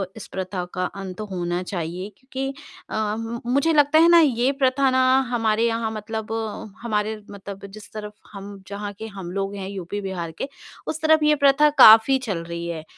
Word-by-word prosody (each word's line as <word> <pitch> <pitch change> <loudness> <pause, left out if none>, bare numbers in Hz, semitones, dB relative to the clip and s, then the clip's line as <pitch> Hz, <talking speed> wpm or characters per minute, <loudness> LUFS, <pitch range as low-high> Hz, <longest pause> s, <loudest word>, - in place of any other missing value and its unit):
इस 220 - -9
प्रथा 185 -1 -4
का 180 0 -1 0.2
अंत 190 +1 -7
होना 175 -1 -2
चाहिए 180 +1 -5
क्योंकि 265 +1 -5 0.4
अ, 215 -1 -1
म 230 +1 -5
मुझे 280 +4 +3
लगता 295 +1 +5
है 330 - +7
ना 340 0 +8
ये 260 -4 +3
प्रथा 265 +1 +3
ना 260 - +2 0.3
हमारे 225 -2 +1
यहाँ 230 -1 -1
मतलब 220 0 -5 0.5
हमारे 215 -2 -1 0.2
मतलब 200 0 -9
जिस 205 +1 -12
तरफ़ 210 -1 -7 0.2
हम 200 -1 -9
जहाँ 205 +1 -5
के 220 - -6
हम 195 -4 -8
लोग 195 +1 -3
हैं 195 -1 -5
यूपी-बिहार 190 -2 -5
के, 165 +11 -5 0.4
उस 315 - -4
तरफ़ 315 0 +4
ये 300 0 +5
प्रथा 285 +1 +4
काफ़ी 225 +5 +8
चल 200 -10 -4
रही 170 0 -6
है 165 -2 -5
215 Hz, 180 wpm, -23 LUFS, 190-255 Hz, 0.5 s, ना